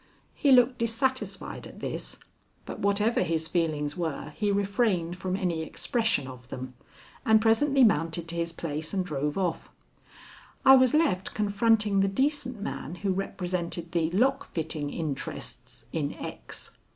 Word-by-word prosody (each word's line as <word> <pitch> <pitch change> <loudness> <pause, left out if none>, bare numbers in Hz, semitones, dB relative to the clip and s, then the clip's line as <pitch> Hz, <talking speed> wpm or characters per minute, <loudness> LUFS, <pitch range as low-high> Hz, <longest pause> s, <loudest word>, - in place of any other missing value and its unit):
He 285 - +2
looked 250 0 +5
dissatisfied 260 +3 -2
at - - -13
this, - - -5 0.5
but - - -7
whatever 205 +3 +2
his 160 -1 0
feelings 155 -4 -1
were 160 -3 -3
he 210 -1 0
refrained 200 -4 +1
from 185 0 -2
any 180 -5 -1
expression 220 - 0
of 125 -1 -10
them, 130 0 -7 0.5
and 220 -1 +5
presently 260 +5 +4
mounted 165 -5 +2
to 170 - -3
his 170 0 -1
place 160 +1 -4
and 185 -2 0
drove 150 -1 -2
off. 180 -4 -1 1.0
I 265 0 +10
was 260 +1 +5
left 285 - +1
confronting 210 0 +3
the 195 - +4
decent 260 +2 0
man 180 -4 -5
who 195 - +2
represented 180 -3 -3
the 165 -2 +1
lock 245 +10 +2
fitting 155 -3 -3
interests 145 -4 -5
in - - -2
X. - - -8
185 Hz, 145 wpm, -28 LUFS, 165-225 Hz, 1.0 s, I